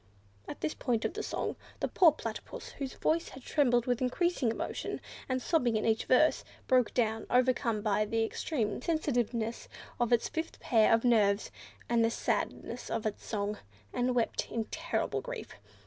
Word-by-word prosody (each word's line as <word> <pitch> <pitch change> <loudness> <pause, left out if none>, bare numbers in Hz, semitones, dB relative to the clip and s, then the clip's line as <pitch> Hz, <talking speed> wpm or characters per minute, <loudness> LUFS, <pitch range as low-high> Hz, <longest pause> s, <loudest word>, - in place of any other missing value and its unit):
At - - -7
this 150 - -1
point 235 -3 -1
of - - -1
the - - -3
song, - - -3 0.2
the - - 0
poor 345 -4 +6
Platypus, - - -6
whose 270 -2 -4
voice 330 +1 +1
had 265 - -11
trembled 245 -5 +2
with 245 -1 0
increasing 265 +1 +1
emotion 225 - -3 0.3
and 255 0 +1
sobbing 250 -6 +2
in 215 - -1
each 225 0 +2
verse, 305 +5 +4 0.2
broke 255 -3 +3
down, 225 -2 0
overcome 245 -4 +2
by 210 0 +2
the 225 +1 0
extreme 225 -2 -2
sensitiveness 240 -8 -1 0.3
of 240 -1 +1
its 235 -1 +3
fifth 325 0 -4
pair 220 -3 +4
of 225 0 +4
nerves 210 -4 +3 0.4
and 235 -1 +3
the 225 - +4
sadness 235 +1 -2
of 225 -1 -2
its 215 - -3
song, 210 -1 -2 0.3
and 245 0 +1
wept 235 -2 0
in 225 -1 -2
terrible - - -1
grief. - - -7
240 Hz, 170 wpm, -31 LUFS, 220-255 Hz, 0.4 s, poor